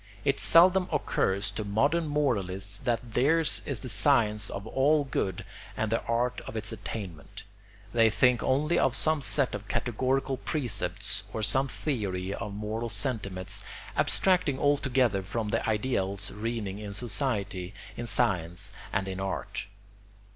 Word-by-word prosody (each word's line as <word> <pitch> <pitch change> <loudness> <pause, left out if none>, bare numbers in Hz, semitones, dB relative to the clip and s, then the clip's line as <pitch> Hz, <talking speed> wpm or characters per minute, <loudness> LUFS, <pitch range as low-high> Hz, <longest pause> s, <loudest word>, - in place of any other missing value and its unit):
It 140 - +2
seldom 180 +2 +6
occurs 100 -9 0
to 105 +2 -4
modern 140 +11 +1
moralists 100 -9 -1
that 120 -2 -2
theirs 155 +5 +3
is 140 -5 -2
the - - -4
science 105 -2 +3
of 100 +1 -6
all 145 +6 +2
good 95 -9 -3 0.3
and 110 -1 -1
the 115 - +1
art 120 +1 0
of - - -7
its 105 -1 -2
attainment; 100 -7 -7 0.5
they 115 -1 +5
think 120 +3 +3
only 150 +6 +1
of 130 - +2
some 155 0 +5
set 140 -1 +2
of 105 0 -6
categorical 130 +4 -1
precepts 125 - -1
or 110 - -3
some 135 +5 +4
theory 100 -10 -3
of 105 - -5
moral 110 +3 -4
sentiments, 100 -4 -1 0.3
abstracting 180 -8 +2
altogether 130 -7 +2
from 105 +3 -3
the 115 +2 0
ideals 105 -3 0
reigning 105 -2 -4
in 105 -1 -7
society, 100 -4 -3 0.2
in 120 - -5
science, 90 -9 0 0.2
and 95 0 -1
in 95 0 -4
art. 95 +1 -4
115 Hz, 140 wpm, -28 LUFS, 100-135 Hz, 0.5 s, seldom